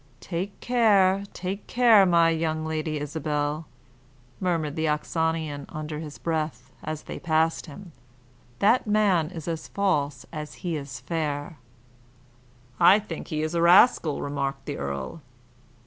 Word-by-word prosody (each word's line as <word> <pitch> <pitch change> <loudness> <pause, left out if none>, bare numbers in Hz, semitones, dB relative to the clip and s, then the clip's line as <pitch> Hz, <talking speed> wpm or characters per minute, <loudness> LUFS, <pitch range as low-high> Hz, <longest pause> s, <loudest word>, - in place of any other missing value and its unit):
"Take 190 +3 -5
care, 200 -5 +3
take 190 +3 -5
care, 230 -5 +6
my 170 -1 +4
young 160 -1 -1
Lady 155 -1 -2
Isabel," 150 +1 -2 0.7
murmured 165 -5 -1
the 160 0 0
Oxonian 155 -1 -1
under 155 0 -5
his 150 -2 -8
breath, 155 -4 -3
as 155 0 -5
they - - -7
passed 160 0 +1
him, 175 +4 -11 0.7
"that 220 +4 +3
man 200 -7 +2
is 165 -3 -8
as 165 -2 -4
false 145 -10 -1
as 150 -1 -6
he 170 -2 -1
is 140 -2 -6
fair." 150 -2 -3 1.2
"I 195 - +7
think 200 -6 -6
he 155 0 -2
is 155 +1 -2
a 170 - +1
rascal," 170 - +5
remarked 140 -1 -3
the - - -4
earl. 70 -1 -5
160 Hz, 135 wpm, -26 LUFS, 150-180 Hz, 1.2 s, I